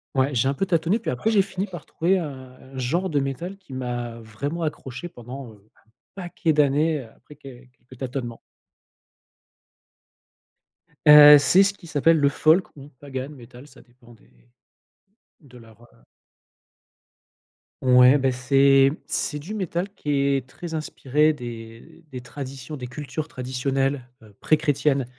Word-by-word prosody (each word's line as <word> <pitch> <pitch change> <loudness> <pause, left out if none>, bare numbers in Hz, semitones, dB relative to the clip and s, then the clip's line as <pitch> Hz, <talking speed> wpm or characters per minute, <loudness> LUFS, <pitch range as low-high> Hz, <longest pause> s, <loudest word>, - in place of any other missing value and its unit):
Ouais 135 +2 +1
j'ai 120 +2 +2
un 140 - 0
peu 195 - -1
tâtonné, 170 +2 +1
puis 230 - -3
après 125 - -1
j'ai 205 - +4
fini 190 +1 -5
par 175 -4 -10
trouver 185 +4 0
un 155 -5 -5 0.4
un - - -9
genre 170 +9 -1
de 145 - +1
métal 140 +8 -4
qui 185 -9 -14
m'a 120 -2 -5
vraiment 140 +10 -5
accroché 150 +1 -5
pendant, 125 -1 -10
heu, 105 +1 -23 0.2
un 110 - -33 0.3
paquet 175 -3 -2
d'années, 150 +1 +2
après 150 - -17
quel 130 -3 -14
quelques 125 0 -19
tâtonnements. 125 -3 -5 2.7
Heu, 150 0 +10
c'est 180 +8 +5
ce 200 - +1
qui 175 -4 -15
s'appelle 160 +2 +3
le 145 -1 +3
folk, 155 +4 +2
ou 140 0 -12
pagan 135 -2 -6
métal, 125 -1 -14
ça 135 - -18
dépend 120 -1 -20
des 110 - -25 1.1
de 130 -6 -17
leur, 115 -1 -18
heu - - -26 1.8
Ouais 125 +1 +6
beh 135 -2 +1
c'est 135 +2 +4 0.2
c'est 150 -1 -2
du 200 +9 -7
métal 185 0 -3
qui 150 - -5
est 140 -2 +1
très 170 +4 -8
inspiré 150 -1 0
des 115 0 -10
des 125 - -6
traditions, 135 +3 -8
des 125 - -7
cultures 145 +4 -6
traditionnelles, 135 0 -2
heu, 110 -1 -17
préchrétiennes, 145 -3 +1
140 Hz, 150 wpm, -23 LUFS, 125-155 Hz, 2.7 s, Heu